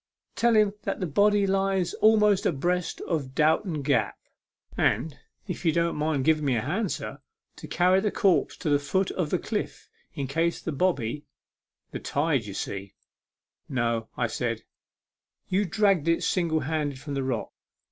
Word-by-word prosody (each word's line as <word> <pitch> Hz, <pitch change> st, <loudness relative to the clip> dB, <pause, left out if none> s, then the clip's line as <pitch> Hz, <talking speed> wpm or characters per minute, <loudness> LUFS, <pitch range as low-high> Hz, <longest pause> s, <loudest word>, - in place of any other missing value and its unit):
Tell 235 Hz, -1 st, +3 dB
him 210 Hz, -2 st, +4 dB
that -, -, -3 dB
the 185 Hz, -, -1 dB
body 205 Hz, +5 st, +3 dB
lies 195 Hz, -2 st, +1 dB
almost 210 Hz, -2 st, +4 dB
abreast 175 Hz, +4 st, -1 dB
of 140 Hz, -6 st, -3 dB
Dowton 155 Hz, 0 st, +1 dB
G 140 Hz, +1 st, +2 dB
ap; -, -, 0 dB, 0.6 s
and, 155 Hz, -3 st, +1 dB, 0.3 s
if -, -, -5 dB
you 165 Hz, -, +3 dB
don't 170 Hz, +1 st, 0 dB
mind 150 Hz, -3 st, 0 dB
giving 155 Hz, -1 st, +3 dB
me 135 Hz, -3 st, +2 dB
a 115 Hz, -, 0 dB
hand, 190 Hz, -, -1 dB
sir, -, -, -5 dB, 0.4 s
to -, -, -9 dB
carry 180 Hz, +2 st, +3 dB
the 210 Hz, +2 st, 0 dB
corpse 185 Hz, -7 st, +2 dB
to 175 Hz, -4 st, -3 dB
the 145 Hz, -, +4 dB
foot 190 Hz, +7 st, 0 dB
of 175 Hz, -5 st, -2 dB
the -, -, +1 dB
cliff, -, -, -4 dB, 0.3 s
in 140 Hz, -, -2 dB
case 165 Hz, +5 st, 0 dB
the 165 Hz, -, -4 dB
bobby 145 Hz, -4 st, -1 dB, 0.6 s
the -, -, -5 dB
tide 145 Hz, -5 st, 0 dB
ye 100 Hz, -, -6 dB
see 100 Hz, 0 st, -5 dB, 0.2 s
" -, -, -67 dB
" -, -, -48 dB
No," 115 Hz, -3 st, -1 dB, 0.2 s
said -, -, -2 dB
I; -, -, -35 dB, 0.4 s
" -, -, -50 dB
you 195 Hz, +2 st, +2 dB
dragged 195 Hz, -4 st, +2 dB
it 165 Hz, 0 st, +2 dB
single 165 Hz, -4 st, +1 dB
handed 145 Hz, -1 st, -2 dB
from 145 Hz, +1 st, -6 dB
the 135 Hz, -, -1 dB
rock. 130 Hz, -4 st, -2 dB
160 Hz, 180 wpm, -26 LUFS, 140-190 Hz, 0.6 s, him